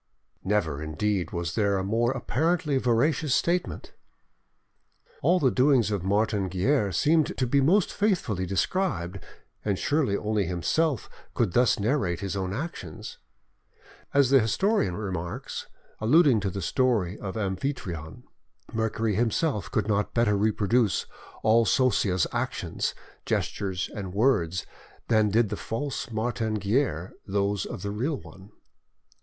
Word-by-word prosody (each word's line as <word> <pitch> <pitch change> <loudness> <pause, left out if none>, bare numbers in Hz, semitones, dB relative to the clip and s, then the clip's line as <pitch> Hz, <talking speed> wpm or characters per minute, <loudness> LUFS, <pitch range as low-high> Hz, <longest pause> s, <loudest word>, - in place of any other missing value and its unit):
Never, 90 -8 0
indeed, 90 +5 -1
was 85 -1 -3
there 100 -3 +1
a 95 - -1
more 115 +4 +1
apparently 150 +3 0
veracious 130 +4 +2
statement! 175 +1 -1 1.3
All 180 - +3
the 130 -5 +3
doings 130 -4 +3
of 100 -4 -1
Martin 100 0 +1
Guerre 100 - +1
seemed 155 - +2
to 130 - +1
be 140 +3 +2
most 175 +8 +3
faithfully 145 - 0
described, 95 - -1 0.4
and 100 -3 0
surely 140 -8 +1
only 105 -3 -1
himself 120 - 0 0.3
could 105 -7 +1
thus 125 +2 +4
narrate 100 - 0
his 100 0 -3
own 95 -1 -2
actions. 105 - -6 0.9
As 140 -2 +3
the 135 - +7
historian 115 - +1
remarks, 90 -5 -5 0.3
alluding 135 +1 +5
to 100 -1 -1
the 95 0 -5
story 110 -6 +1
of 95 +2 -5
Amphitryon, 95 - -4 0.5
Mercury 110 -1 0
himself 115 - 0
could - - -1
not 105 -1 0
better 115 -3 +3
reproduce 105 +1 +1 0.4
all 115 +1 +5
Sosia's 105 - +2
actions, - - -2 0.3
gestures, 95 -2 -2
and 95 -3 -6
words, 95 -7 +2 0.4
than 110 -2 +4
did 110 +1 +2
the - - -2
false 130 +4 -4
Martin 110 -1 -1
Guerre 100 - 0
those 100 0 0
of 115 -7 -7
the 100 - -2
real 130 +9 -1
one. 95 +2 -14
110 Hz, 130 wpm, -27 LUFS, 95-130 Hz, 1.3 s, the